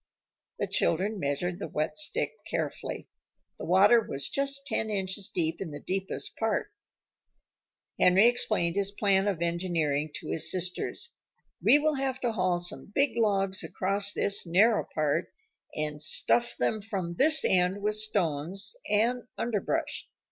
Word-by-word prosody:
The - - -1
children 200 +5 0
measured 175 +4 -2
the - - -4
wet 155 0 -2
stick 305 - +1 0.2
carefully. - - -4 0.5
The - - -6
water 200 +6 +6
was 135 -9 -3
just 275 0 -2
ten 220 -6 -1
inches 195 0 -2
deep 165 -3 -1
in 190 - -4
the 145 -1 -7
deepest 190 +4 -3
part. - - -1 1.3
Henry 190 +5 +6
explained 210 -7 +1
his 200 -1 +2
plan 200 -1 +1
of 180 -4 -1
engineering 165 -4 -1
to - - -7
his 160 0 +2
sisters. 185 - -3 0.5
"We 290 - +6
will 305 +1 +1
have 265 -1 -2
to 240 - 0
haul 185 -4 0
some 175 +3 -6
big 280 +1 +3
logs 195 -4 +1
across 200 +2 0
this 200 0 0
narrow 205 +6 +3
part 155 +2 -1 0.4
and 150 -1 -2
stuff 240 +9 +2
them 220 -1 0
from 195 -5 -4
this 310 - +5
end 180 +2 +2
with 210 0 +1
stones 195 - 0
and 235 +3 +1
underbrush. 225 -4 -2
195 Hz, 145 wpm, -28 LUFS, 170-220 Hz, 1.3 s, water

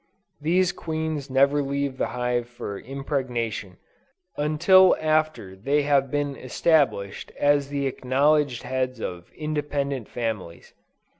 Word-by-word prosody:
These 175 +4 +2
queens 160 -3 -4
never 140 +2 +3
leave 140 -1 -2
the - - +1
hive 125 -1 -2
for 100 -4 -6
impregnation, 125 - -3 0.6
until 170 +5 +5
after 155 -11 0
they 140 +9 +1
have 140 -2 +2
been 145 0 -1
established 130 -7 0
as 145 -1 +3
the 140 -1 -2
acknowledged 135 0 +1
heads 130 -1 -2
of 90 -4 -6
independent 145 -5 -3
families. 110 -8 -5
140 Hz, 115 wpm, -25 LUFS, 125-150 Hz, 0.6 s, until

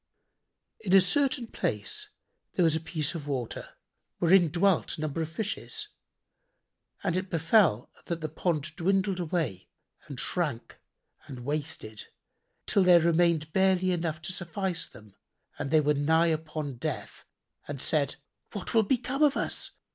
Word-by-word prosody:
In 190 -3 -2
a - - +10
certain 260 +7 +2
place 420 - -2 0.4
there 180 - +2
was 160 -2 +4
a - - +1
piece 160 -1 -3
of 155 -4 -6
water, 130 -5 -3 0.5
wherein 175 -1 +5
dwelt 180 +3 +2
a - - -6
number 155 +1 -2
of 160 - -2
Fishes, 220 - -3 1.1
and 180 -4 0
it 185 +1 -2
befel 165 - +3
that 170 -1 -3
the 155 - -3
pond 155 -1 -2
dwindled 190 +1 +1
away 155 - -2 0.4
and 140 -4 -6
shrank 150 -10 -2 0.5
and 125 -2 -8
wasted, 145 -7 -4 0.6
till 200 - +3
there 180 -2 +7
remained 165 -2 +2
barely 190 -1 +3
enough 165 -3 -1
to 185 - -3
suffice 175 0 -3
them 105 -2 -16 0.5
and - - -2
they 155 +1 +5
were 150 0 +3
nigh 160 +4 +3
upon 155 -4 -4
death - - -5 0.4
and 145 -2 -5
said, 140 0 +1 0.4
"What 205 - -5
will 225 - +6
become 255 +5 -1
of 295 -2 +5
us? - - -2
165 Hz, 145 wpm, -29 LUFS, 150-190 Hz, 1.1 s, a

